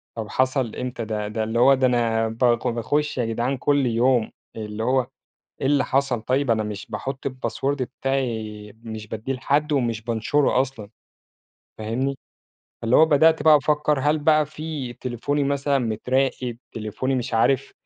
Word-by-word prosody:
طَب 110 -2 -4
حصل 130 -3 0
إمتى 125 -2 -4
ده؟ 105 -1 -3
ده 110 +1 -2
اللي 110 +2 -1
هو، 135 +3 +7
ده 130 -1 +3
أنا 115 -2 +1
ب 110 0 -7 0.3
باخُش 135 +6 -1
يا 120 - +1
جدعان 120 +4 -1
كل 140 +1 +2
يوم، 120 0 +2 0.2
اللي 110 0 -5
هو 130 +1 +1 0.5
إيه - - +1
اللي 140 -1 +3
حصَل؟ 135 -3 0
طيِّب 130 +2 +1
أنا 110 -1 +1
مش 105 -1 -6
باحُط 135 0 -4
الpassword 130 +1 -2
بتاعي 115 -6 -3
مش 110 -2 -7
بادّيه 110 +5 -4
لحد 145 +4 0
ومش 120 -5 0
بانشُره 120 +4 +1
أصلًا، 130 -6 -6 0.9
فاهمني؟ 120 +6 -2 0.7
اللي 115 +2 +3
هو 160 - +7
بدأت 160 +1 +4
بقى 155 -1 +7
أفكَّر، 150 0 +1
هل 150 +3 +2
بقى 155 0 +4
في 150 -4 -6
تليفوني 130 +4 -2
مثلًا 140 0 +1
متراقَب؟ 125 +1 -1
تليفوني 115 +4 -3
مش 125 -2 -3
عارِف، 135 +4 +2
125 Hz, 160 wpm, -23 LUFS, 115-140 Hz, 0.9 s, هو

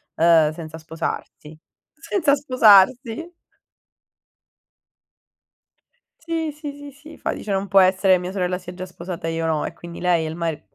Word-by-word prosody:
ehm, 160 -2 +4
senza 160 -1 -9
sposarsi. 160 -1 -6 0.4
Senza 325 -2 +1
sposarsi. 250 - +4 2.9
Sì, 325 -2 -3
sì, 295 -1 -7
sì, 285 0 -11
sì. 310 +3 -14
Fa - - -3
dice: 210 - -6
"Non 195 +1 -1
può 195 0 +5
essere, 185 0 +4
mia 180 +1 -5
sorella 180 -2 -1
si 180 -1 -11
è 180 - -7
già 185 +1 -7
sposata 175 -2 -7
e 165 - -2
io 165 0 -2
no." 155 -2 0
E - - -5
quindi 170 0 -10
lei 175 -2 +1
e - - -3
il 160 - -6
mari 165 -3 -3
185 Hz, 160 wpm, -22 LUFS, 165-270 Hz, 2.9 s, può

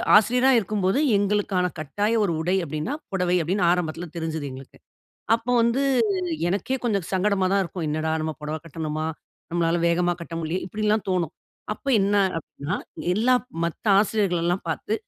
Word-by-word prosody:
ஆசிரியரா 250 +5 +5
இருக்கும்போது, 200 +3 0 0.2
எங்களுக்கான 200 -2 +1
கட்டாய 205 +9 -1
ஒரு 170 - 0
உடை" 180 +3 +1
அப்படீன்னா 155 - -3 0.2
'புடவை' 180 -1 +1
அப்படீன்னு 180 +3 +1
ஆரம்பத்துல 175 -1 -1
தெரிஞ்சுது 160 -2 -3
எங்களுக்கு. 130 +1 -11 0.6
அப்போ 230 +2 -2
வந்து 235 +4 +2 0.7
எனக்கே 205 +8 -1
கொஞ்சம் 200 -7 0
சங்கடமா 190 0 +2
தான் 200 -1 +3
இருக்கும். 170 0 -5
"என்னடா 155 +1 -1
நம்ம 155 0 -2
பொடவ 155 +1 -3
கட்டணுமா? 155 -1 -3 0.4
நம்மளால 170 0 +1
வேகமா 175 +1 +2
கட்ட 170 0 -7
முடிலையே!" 165 +3 -2
இப்படியெல்லாம் 215 +1 0
தோணும். 175 -3 0 0.4
அப்ப - - -24
என்ன 200 +1 +2 0.2
அப்படீன்னா, 140 -2 -5 0.4
எல்லா 245 +5 +3 0.3
மத்த 170 +6 -4
ஆசிரியர்களல்லாம் 180 -5 0
பார்த்து, 205 +6 -2
180 Hz, 145 wpm, -24 LUFS, 165-210 Hz, 0.7 s, ஆசிரியரா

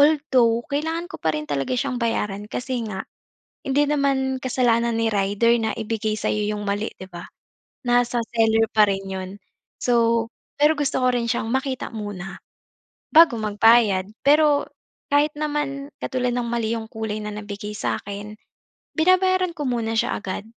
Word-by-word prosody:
Although 260 -6 +3
kailangan 320 +4 -2
ko - - -5
pa 160 -1 +1
rin 150 - -4
talaga 140 - -1
siyang 255 -1 -1
bayaran 210 -3 -2
kasi 250 0 -3
nga, 190 -2 -5 0.6
hindi 285 +2 +3
naman 275 -2 +1
kasalanan 235 -2 +1
ni 225 0 +1
rider 205 +4 +2
na 220 0 0
ibigay 220 -1 -2
sa'yo 210 0 -1
'yung 210 0 -4
mali, 205 +2 -1
di 190 - -6
ba? 175 -2 -9 0.6
Nasa 245 0 +2
seller 225 0 +4
pa 215 -1 +5
rin 195 0 -1
'yun. 190 -1 -5 0.5
So, 230 -1 +3 0.4
pero 300 +2 +6
gusto 285 -2 0
ko - - +4
rin 240 -1 0
siyang 225 -1 -1
makita 265 -1 -2
muna 200 -3 -6 0.7
bago 320 -7 +7
magbayad. 210 -2 +4 0.2
Pero 295 0 +4 0.4
kahit 290 +1 +3
naman 290 -2 -2
katulad 250 -1 -1
ng 245 -1 -1
mali 230 -1 -1
'yung 220 0 -7
kulay 220 -1 -4
na 210 - -4
nabigay 210 0 -6
sa'kin, 205 +1 -4 0.6
binabayaran 370 +1 +3
ko 295 - -3
muna 225 -2 -1
siya - - +1
agad, 195 +1 -5
235 Hz, 155 wpm, -23 LUFS, 210-275 Hz, 0.7 s, bago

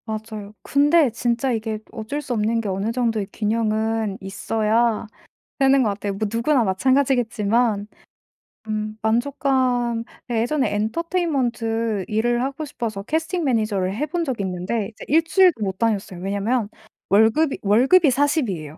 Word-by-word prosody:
맞아요. 215 -2 -6
근데 290 0 +3
진짜 240 +3 0
이게 220 -2 -2
어쩔 225 +7 -4
수 255 - -4
없는 225 +1 +1
게 210 - -4
어느 195 +4 -1
정도의 230 -4 -1
균형은 220 -1 -1
있어야 220 +4 0 0.5
되는 270 -1 +4
것 225 - +2
같아요. 200 0 -3
뭐 210 +2 -2
누구나 240 +2 +2
마찬가지겠지만 230 -1 +1 0.8
음 215 0 -3
만족감 245 0 +1 0.3
예 230 -2 +1
예전에 265 0 0
엔터테인먼트 230 - -1
일을 240 +3 +1
하고 275 +3 -3
싶어서 225 -7 -4
캐스팅 325 - -1
매니저를 215 -7 0
해 280 +7 -1
본 340 +3 -2
적이 250 -8 -2
있는데 190 +3 -2
이제 220 - -12
1 320 +3 +4
주일도 355 - +3
못 190 -1 -3
다녔어요. 205 -5 -1
왜냐면 205 +4 -1 0.4
월급이 220 +9 +3
월급이 265 - +4
40 285 -1 +1
이에요 155 -4 -6
230 Hz, 320 characters per minute, -22 LUFS, 215-265 Hz, 0.8 s, 되는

